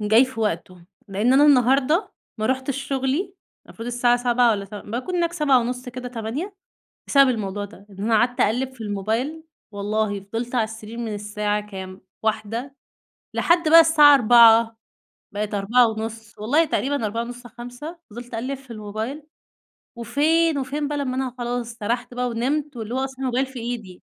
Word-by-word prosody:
جاي 220 +4 +5
في 255 -3 -7
وقته، 180 -3 -3 0.2
لأن 210 +6 +1
أنا 285 +2 +6
النهاردة 275 - +3 0.3
ما 215 - 0
رُحتش 260 +1 -1
شغلي 275 +8 -2 0.3
المفروض 230 - -9
الساعة 245 0 +2
7:00 245 0 +3
والّا 200 -3 -1
ت 200 - -12
باكون 240 - -4
هناك 340 -1 0
7:30 255 -5 +1
كده، 250 0 -6
8:00 250 - -5 0.5
بسبب 275 -2 +5
الموضوع 205 -4 -2
ده، 200 0 -15
إن 195 - -15
أنا 225 0 +2
قعدت 245 +2 +1
أقلّب 250 +5 +1
في 245 - -13
الموبايل، 220 +10 -2 0.3
والله 205 0 -1
فضلت 230 +5 -5
علي 235 - +3
السرير 220 +1 -8
من 225 -3 -3
الساعة 210 0 -2
كام؟ 190 -1 -8 0.2
1:00، 220 +5 -2 0.6
لحد 340 -2 +2
بقى 330 - +10
الساعة 305 -3 +7
4:00 230 -2 +6 0.6
بقِت 210 0 -3
4:30 220 +1 0
والله 285 +10 +2
تقريبًا 280 -4 -1
4:30 235 +3 -5
5:00 245 +8 -9
فضلت 240 +3 -10
أقلّب 255 +5 -3
في 260 -2 -15
الموبايل، 220 +7 -5 0.8
وفين 315 +5 +2
وفين 285 +2 -2
بقى 295 -1 -2
لمّا 260 -2 -2
أنا 260 -2 -2
خلاص 240 0 -2
سرحت 240 +3 -3
بقى 250 0 -1
ونمت 270 +5 -2
واللي 225 +1 -5
هو 260 - 0
أصلًا 265 0 -4
الموبايل 260 0 0
في 265 -1 -9
إيدي. 225 -6 -6
240 Hz, 160 wpm, -23 LUFS, 220-270 Hz, 0.8 s, بقى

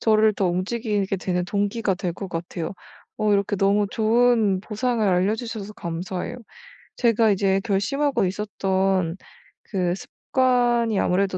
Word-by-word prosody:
저를 215 -1 +4
더 195 - +3
움직이게 200 +2 -1
되는 180 -1 -1
동기가 205 +2 0
될 180 -2 -3
것 195 +2 -7
같아요. 170 0 -4 0.4
어 215 -1 +1
이렇게 200 +1 +1
너무 200 +2 +2
좋은 225 -3 +3
보상을 225 +2 -1
알려주셔서 210 +3 -1
감사해요. 180 +6 -4 0.6
제가 230 -2 +3
이제 195 0 +2
결심하고 235 +5 +1
있었던 190 -2 0 0.5
그 180 -4 -1
습관이 240 -1 +1
아무래도 190 +1 +1
200 Hz, 295 characters per minute, -23 LUFS, 185-225 Hz, 0.6 s, 저를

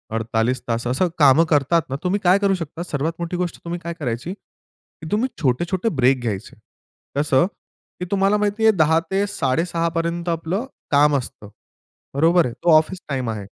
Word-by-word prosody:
48 115 +2 0
तास 115 0 -2
असं 130 +9 +1
कामं 145 +3 +6
करतात 150 +3 +3
ना, 135 - -2
तुम्ही 190 +3 0
काय 185 +2 +5
करू 200 -1 +2
शकता 165 -1 -6
सर्वात 155 -1 -2
मोठी 170 +1 -3
गोष्ट 180 -1 -3
तुम्ही 175 +1 -4
काय 170 -1 -5
करायची? 140 +2 -4
की 165 -4 -18
तुम्ही 220 +5 +1
छोटे-छोटे 175 - 0
ब्रेक 130 0 +3
घ्यायचे. 105 -5 -4 0.6
कसं 145 0 +3 0.5
की 180 - -3
तुम्हाला 200 +1 +3
माहिती 210 +1 -1
आहे 220 - +7
10:00 160 0 +4
ते 195 +1 +1
6:30 170 0 -1
पर्यंत 170 +1 -2
आपलं 170 +7 -2 0.3
काम 145 +1 +4
असतं. 105 -5 -8 0.6
बरोबर 165 +5 +4
आहे 120 - -4
तो 175 - +4
ऑफिस 180 +4 0
टाईम 130 -4 -2
आहे. 105 -3 -4
165 Hz, 170 wpm, -21 LUFS, 130-180 Hz, 0.6 s, आहे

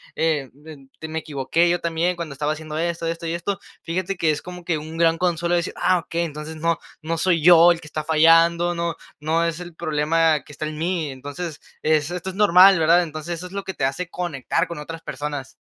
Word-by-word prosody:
eh, 155 -5 0 0.2
em, 140 -4 -12
be 160 - -6
me 160 +1 -3
equivoqué 155 +3 0
yo 175 +1 +1
también 170 +2 0
cuando 170 -4 -6
estaba 145 +2 -1
haciendo 155 0 -7
esto, 170 0 -2
esto 165 0 -3
y 165 - -2
esto". 190 +4 -3 0.2
Fíjate 185 +3 -2
que 160 -2 +2
es 150 - -3
como 180 0 -9
que, 165 -3 0
un 160 +2 -8
gran 165 0 +3
consuelo 175 -1 0
de - - +4
decir: 170 - -4
"Ah, 180 - +3
ok. 165 - -11
Entonces 160 -2 -3
no, 165 +1 0 0.3
no 165 +1 -2
soy 170 -2 +2
yo 175 0 +8
el 170 - -1
que 165 - -14
está 155 0 -4
fallando, 165 +2 +4
no 170 0 -2 0.2
no 160 +2 +1
es 170 -1 -2
el 175 -2 -9
problema 155 0 +1
que - - -15
está 150 +2 -5
en 155 0 -5
mí". 165 -3 -1
Entonces, 145 +4 -7 0.2
eh, 155 0 +4
esto 175 +4 -5
es - - -6
normal, 190 -2 +7
¿verdad? 165 +3 +5
Entonces, 155 +1 -5
eso 170 - -8
es 180 - -9
lo 200 0 -4
que 190 - -5
te 135 - 0
hace 155 +6 -2
conectar 170 -1 -2
con 170 - -7
otras 165 +2 -7
personas. 145 -2 -5
165 Hz, 235 wpm, -22 LUFS, 155-175 Hz, 0.3 s, yo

